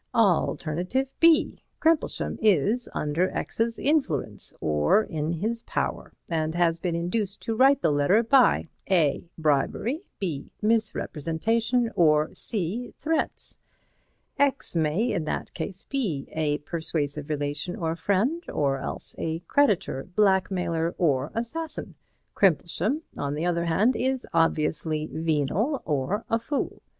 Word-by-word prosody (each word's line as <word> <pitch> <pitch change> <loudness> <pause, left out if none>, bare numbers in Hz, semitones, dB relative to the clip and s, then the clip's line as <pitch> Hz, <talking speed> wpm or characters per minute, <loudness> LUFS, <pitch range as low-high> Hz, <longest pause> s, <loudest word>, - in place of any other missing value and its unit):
Alternative 180 - +1
B: 330 -1 +4 0.2
Crimplesham 320 -1 +1
is 215 - +2
under 155 +5 0
X's 230 0 -1
influence 155 - +1
or 75 - +3
in 155 -3 -3
his 220 +7 -2
power, - - -3 0.2
and 160 -1 -1
has 170 -1 +2
been 170 -1 -2
induced 190 +4 -2
to 225 - -1
write 270 +4 +4
the - - +3
letter 145 +10 +3
by 255 -6 +4 0.2
(a) 170 -3 +2
bribery, 160 - 0 0.2
(b) 160 -8 -4
misrepresentation 225 - 0
or 155 -2 +3
(c) 220 +4 -3
threats. 320 0 -1 0.8
X 280 -8 +1
may 165 +9 +1
in 165 - -1
that - - -4
case 190 -2 -5
be 200 - -1
a 150 -2 0
persuasive 150 -3 -3
relation 145 +3 -2
or 165 -1 -2
friend, 220 - 0
or 135 -2 0
else - - -4
a 165 +1 -2
creditor, 205 - +1
blackmailer 185 -5 +1
or 140 -7 +1
assassin; 310 +8 -3 0.4
Crimplesham, 195 - +1 0.2
on 140 0 -2
the 155 +3 -2
other 170 -1 0
hand, 205 +10 +2
is 260 +1 -1
obviously 155 -1 +1
venal 165 - 0
or 150 +8 -1
a 225 - +1
fool. 280 +5 -3
175 Hz, 125 wpm, -26 LUFS, 155-230 Hz, 0.8 s, B